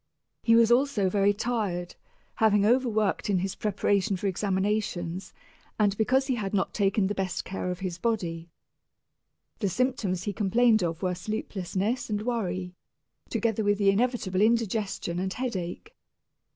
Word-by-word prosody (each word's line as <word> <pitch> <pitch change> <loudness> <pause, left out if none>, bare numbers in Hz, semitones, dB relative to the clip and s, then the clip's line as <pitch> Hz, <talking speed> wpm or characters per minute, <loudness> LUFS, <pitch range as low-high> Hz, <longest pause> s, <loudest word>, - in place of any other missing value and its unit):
He 230 - +4
was 230 0 +5
also 240 -7 +3
very 200 0 +3
tired, 205 -5 -2 0.4
having 210 -2 +4
overworked 220 -4 +1
in 195 - +3
his 190 +1 -1
preparation 205 -1 0
for 190 - -6
examinations, 190 -2 -1 0.5
and 205 -2 +2
because 260 +5 +2
he 265 - 0
had 205 -4 -2
not 195 - 0
taken 200 0 +2
the 200 - 0
best 190 -3 -3
care 185 -1 -4
of 180 +1 -4
his 185 -2 -4
body. 175 -8 -2 1.1
The 200 - 0
symptoms 205 -5 -1
he 205 - -2
complained 220 +2 +3
of 165 0 -2
were 180 -1 +1
sleeplessness 200 +4 -3
and 210 0 -1
worry, 185 -7 -2 0.6
together 225 -2 0
with 205 0 +2
the 200 -1 +4
inevitable 205 -4 0
indigestion 215 -5 0
and 190 +1 -2
headache. 235 - -4
205 Hz, 145 wpm, -27 LUFS, 185-225 Hz, 1.1 s, was